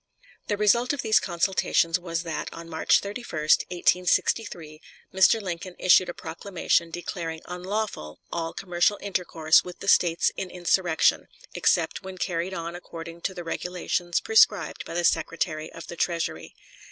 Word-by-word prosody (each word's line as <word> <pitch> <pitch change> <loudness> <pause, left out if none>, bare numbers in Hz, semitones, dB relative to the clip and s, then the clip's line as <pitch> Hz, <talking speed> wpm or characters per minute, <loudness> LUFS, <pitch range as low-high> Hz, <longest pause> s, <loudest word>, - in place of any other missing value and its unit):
The 205 - -1
result 235 +5 +3
of 280 - -4
these 220 -1 +4
consultations 175 -1 +1
was 170 -1 -3
that 165 -2 -4
on 165 0 -9
March 160 -1 +2
31, 200 -5 -5 0.3
1863, 175 -2 0 0.3
Mr. 190 +4 +5
Lincoln 180 -2 -6
issued 185 0 +5
a - - -4
proclamation 170 0 -1
declaring 165 -1 -5
unlawful 180 - -4
all 165 -1 -3
commercial 180 +3 0
intercourse 170 -5 +2
with 180 -1 -9
the 195 - -9
States 170 -3 +4
in 190 - -4
insurrection, 175 -1 +1 0.3
except - - +1
when 190 0 -9
carried 180 +1 -2
on 170 0 -5
according 170 -1 -9
to 190 - -3
the 175 - -6
regulations 175 0 -2
prescribed 445 0 +3
by - - -7
the 175 - 0
Secretary 160 -1 0
of 165 - -10
the - - -8
Treasury. 170 -1 -2
175 Hz, 145 wpm, -26 LUFS, 165-190 Hz, 0.3 s, Mr